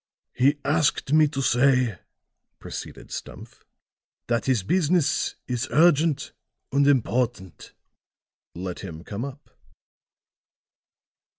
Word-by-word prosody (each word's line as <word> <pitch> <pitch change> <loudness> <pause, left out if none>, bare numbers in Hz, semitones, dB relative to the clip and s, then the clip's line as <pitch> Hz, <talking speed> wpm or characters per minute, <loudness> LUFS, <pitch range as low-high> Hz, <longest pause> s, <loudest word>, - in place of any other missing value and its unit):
"He 140 +4 +3
asked 150 -1 +1
me 155 0 +6
to 135 -2 -3
say," 125 -6 +2 0.6
proceeded - - -9
Stumph, - - -9 0.6
"that 120 -1 -1
his 125 -7 +2
business 170 - +1
is 125 +1 -2
urgent 160 -2 +3 0.4
and 140 +1 +3
important." 120 - 0 0.8
"Let 90 0 -5
him 85 -4 -8
come 105 +4 -5
up." 140 +1 -9
130 Hz, 95 wpm, -25 LUFS, 115-145 Hz, 0.8 s, me